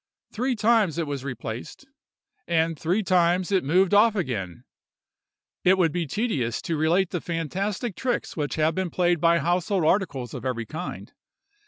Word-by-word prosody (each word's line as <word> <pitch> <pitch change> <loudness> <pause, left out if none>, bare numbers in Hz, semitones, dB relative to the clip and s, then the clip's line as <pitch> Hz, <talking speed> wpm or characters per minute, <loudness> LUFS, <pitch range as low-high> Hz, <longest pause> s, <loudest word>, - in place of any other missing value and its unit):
Three 250 +3 -1
times 215 -6 +2
it 165 - 0
was 140 -3 -4
replaced, 125 - -6 0.6
and 165 -1 +1
three 180 +7 0
times 180 0 +2
it 190 -2 +2
moved 180 +7 +2
off 215 +2 +5
again. 105 - -3 1.0
It 185 +1 +5
would 170 -4 +3
be 175 -1 -2
tedious 140 - -1
to 165 - -2
relate 165 +4 +2
the 175 - -2
fantastic 185 - -3
tricks 250 -2 -2
which 150 -3 -2
have 160 +1 +2
been 190 -1 -2
played 175 -1 +1
by 170 0 +4
household 175 +2 0
articles 150 - 0
of 125 - -6
every 125 -3 -2
kind. 160 +10 -7
175 Hz, 160 wpm, -25 LUFS, 150-190 Hz, 1.0 s, off